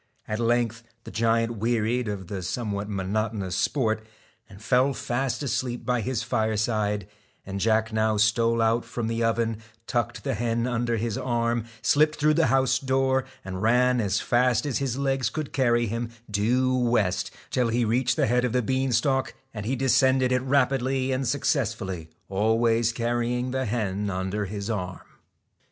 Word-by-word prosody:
At 110 +1 -2
length 115 -1 +1 0.2
the - - -9
giant 115 +1 +1
wearied 115 +2 0
of 100 -2 -4
the 95 +1 -5
somewhat 105 +1 -3
monotonous 100 -1 -2
sport 110 -4 0 0.5
and 100 -2 -13
fell 125 +4 +2
fast 130 +3 -2
asleep 125 -2 -2
by 125 -1 +1
his 125 +1 -2
fireside, 110 -2 0 0.4
and 95 0 -4
Jack 110 +1 +1
now 110 -1 +2
stole 115 +2 +3
out 115 +1 +2
from 120 0 -4
the 115 0 -1
oven, 115 -1 +1 0.3
tucked 120 -1 -2
the 135 - -1
hen 115 +1 -1
under 120 -1 0
his 110 -1 -2
arm, 120 -2 0 0.2
slipped 155 +1 +3
through 150 0 +3
the 165 -1 +3
house 130 0 +3
door 130 -1 +1 0.2
and 95 -1 -5
ran 125 +2 +3
as 100 -1 0
fast 120 +1 +2
as 140 -4 -1
his 135 -3 -2
legs 135 -2 0
could 155 -3 -5
carry 120 -3 +2
him 115 +2 -3 0.2
due 125 +5 +2
west, 115 -7 +1 0.2
till 125 -2 +2
he 115 +1 +1
reached 120 +2 +1
the - - +2
head 125 +2 +2
of 125 -2 0
the 125 -1 +2
bean 130 +2 0
stalk, 135 +3 +1 0.2
and 105 -1 -5
he 130 - 0
descended 130 0 +3
it 125 0 +2
rapidly 135 0 +1
and 130 0 -1
successfully, 110 - -1 0.2
always 115 +3 +2
carrying 120 +1 -1
the 130 0 -1
hen 105 -2 -1
under 95 +2 -2
his 100 +1 -5
arm. 95 -5 -4
115 Hz, 165 wpm, -26 LUFS, 110-125 Hz, 0.5 s, stole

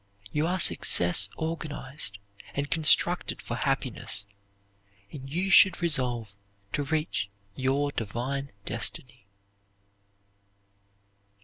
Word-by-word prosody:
You 150 +2 0
are 185 +2 -1
success 90 - +4
organized, 150 -8 -4 0.4
and 140 0 -3
constructed 160 -2 +4
for - - -6
happiness, 100 - -1 0.9
and 135 -2 -9
you 180 +6 -1
should 190 +1 +7
resolve 125 - -1 0.4
to 145 - 0
reach 155 -9 -2 0.2
your 135 +5 0
divine 130 +5 -4
destiny. 100 - -1
140 Hz, 90 wpm, -27 LUFS, 120-160 Hz, 0.9 s, should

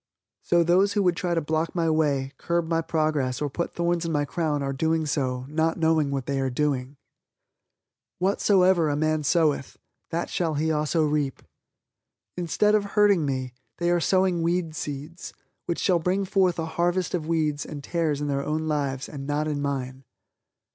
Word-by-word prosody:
So 170 -1 +3
those 185 +4 +3
who 205 -1 +2
would 180 -2 +2
try 175 0 -1
to 165 - +1
block 160 +3 -1
my 170 -2 +1
way, 145 -4 +1
curb 170 -1 -1
my 165 0 +1
progress 155 -6 0
or 145 -2 -2
put 170 +5 -3
thorns 170 0 0
in 165 - -2
my 145 -2 +1
crown 150 -2 -1
are 135 0 -2
doing 160 +3 0
so 130 -4 -1
"not 160 +2 0
knowing 160 -3 +2
what 135 -2 -2
they 140 -1 -1
are 135 -1 0
doing." 135 0 -1 1.2
"Whatsoever 185 -3 +3
a 145 - 0
man 155 +1 +1
soweth, 150 -2 +1 0.3
that 170 +1 -3
shall 165 -3 -1
he 160 +2 0
also 155 +1 +1
reap." 145 -3 -1 0.9
Instead 180 +4 +1
of 210 -1 +3
hurting 200 -7 +4
me, 130 -2 -3 0.2
they 175 0 +1
are 175 - +3
sowing 185 0 +2
weed 170 -1 0
seeds, 150 +3 -6 0.3
which 170 - -1
shall 180 -3 +2
bring 185 +4 0
forth 185 -2 +2
a 165 - -2
harvest 175 +3 -1
of 165 -4 -2
weeds 155 -3 0
and 145 -2 -8
tares 155 -4 -1
in 145 - -1
their 140 -1 -1
own 155 +2 -2
lives, 140 -3 -1
and 140 -2 -7
not 150 +1 0
in 145 -2 -2
mine. 135 -2 -3
160 Hz, 180 wpm, -25 LUFS, 145-170 Hz, 1.2 s, hurting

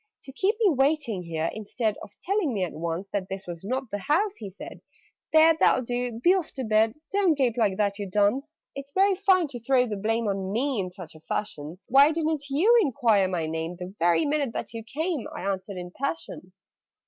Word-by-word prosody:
"To 270 - -10
keep 390 - +1
me 410 -7 +4
waiting 270 -7 +1
here, 165 -1 -2
instead 215 0 -2
Of 205 - -12
telling 380 - 0
me 195 - 0
at 180 - -3
once 170 +4 -4
That 195 -2 -3
this 195 0 -6
was 170 -1 -7
not 255 +3 -3
the 205 - -2
house!" 375 - +1
he 205 - -7
said. 190 - -10 0.5
"There, 315 +1 +6
that'll 255 - +3
do 245 -1 -2
be 345 +9 +5
off 370 -4 -1
to 265 - -4
bed! 220 0 +2 0.2
Don't 390 -5 +3
gape 250 -5 +1
like 210 -6 +1
that, 205 -1 0
you 200 - -3
dunce!" 210 +11 0 0.2
"It's 275 0 -7
very 390 +1 +4
fine 375 -3 +3
to 245 -3 -7
throw 250 +2 +2
the 215 -4 -4
blame 225 +3 0
On 195 -1 -2
me 255 +2 0
in 185 -2 -2
such 180 -3 -11
a 160 - -14
fashion! 155 -2 -5
Why 275 +4 +6
didn't 310 -3 -2
you 360 +13 +4
enquire 225 - +2
my 175 -3 -2
name 160 +2 -4
The 180 +1 -8
very 175 - +3
minute 285 -4 0
that - - -5
you 225 -1 -6
came?" 305 +4 -3
I - - -6
answered 195 0 -3
in 180 0 -7
a - - -22
passion. 170 -3 -4
230 Hz, 220 wpm, -26 LUFS, 190-290 Hz, 0.5 s, There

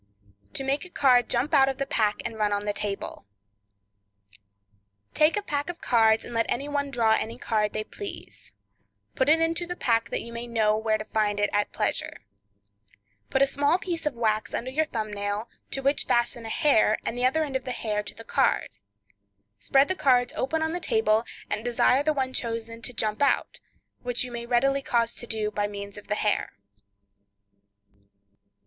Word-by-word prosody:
To - - -2
Make 275 +2 0
a 365 - -10
Card 250 -7 +4
Jump 255 +6 0
Out 270 -2 +6
of 265 - -3
the 275 - -1
Pack 215 -5 0
and 235 - -3
Run 210 -1 0
on 205 0 -1
the 205 - 0
Table.—Take 100 - -5
a 415 - -1
pack 290 -2 -2
of 350 - -6
cards, 220 -2 +3
and - - -8
let 230 0 +1
any 275 +4 -1
one 285 -1 -1
draw 235 -4 +2
any 225 +1 -1
card 215 -4 0
they 215 - -2
please; 405 - -9 0.6
put 260 +2 +1
it 320 +2 +6
into 330 +1 0
the 355 - -4
pack, 230 -7 +1
so - - -21
that - - -2
you 235 - -9
may 235 +1 -5
know 220 -2 +2
where 220 0 +1
to 215 - -7
find 210 -2 0
it 205 - +1
at 205 0 +1
pleasure. - - -2 1.0
Put 270 - +3
a - - +6
small 285 +4 +2
piece 345 -4 -3
of 285 - -2
wax 215 -2 0
under 255 +2 -3
your 310 +4 +1
thumb 215 -7 -4
nail, 205 +2 -3 0.2
to 270 - -2
which 275 +2 +1
fasten 240 -1 +1
a - - -5
hair, 220 -6 +3
and - - -2
the 245 +1 +3
other 315 +5 +1
end 280 -3 -5
of 260 - -2
the - - -4
hair 215 -3 -2
to 205 - -8
the 225 - -10
card; 270 +3 +1 0.9
spread 270 - +3
the - - 0
cards 250 -7 +2
open 315 +4 -1
on 320 - 0
the 350 - -2
table, 220 -7 +2 0.2
and 210 +1 -3
desire 245 +2 +3
the 310 +2 +2
one 265 -3 -1
chosen 230 -1 -4
to 240 - -2
jump 215 0 -2
out, 280 - +1 0.4
which 245 -1 0
you 250 - -6
may 235 0 -6
readily 275 +3 +2
cause 235 -3 +1
to 240 - -7
do 215 -2 -1
by 205 0 -1
means 200 -1 -7
of 205 - -11
the 210 - 0
hair. 210 0 0
235 Hz, 200 wpm, -26 LUFS, 210-275 Hz, 1.0 s, Out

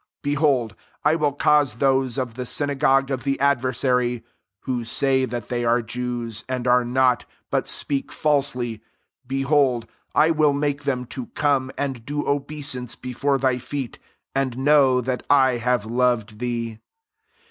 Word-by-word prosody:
9 145 0 0
Behold, 135 -7 +1 0.3
I 150 - +5
will 150 -3 +1
cause 145 -4 +3
those 135 0 +1
of 125 -3 -2
the 125 - -6
syna 145 +2 -1
gogue 135 0 +2
of 130 -1 -2
the 135 -1 -1
adversary* 125 -3 +1 0.4
(who 125 -2 -2
say 130 +3 +2
that 120 -3 -6
they 120 -1 -1
are 120 +1 +2
Jews, 120 -1 -4
and 130 -1 -2
are 125 0 +4
not, 125 -3 +2 0.3
but - - 0
speak 140 -2 0
falsely, 125 -7 0 0.5
behold, 135 -2 +1 0.3
I 155 +2 +5
will 155 -2 +3
make 145 0 -1
them) 125 -2 -1
to 130 -3 -6
come, 140 -3 +1
and 135 -5 -3
do 145 +4 -3
obeisance 140 -4 -1
before 135 +2 -1
thy 130 -1 +1
feet, 130 0 -5 0.3
and 135 -3 -1
know 135 -2 +4
that 125 +1 -2
I 130 -3 +4
have 120 -2 0
loved 115 -2 0
thee. 115 -2 -3
130 Hz, 155 wpm, -23 LUFS, 120-140 Hz, 0.5 s, I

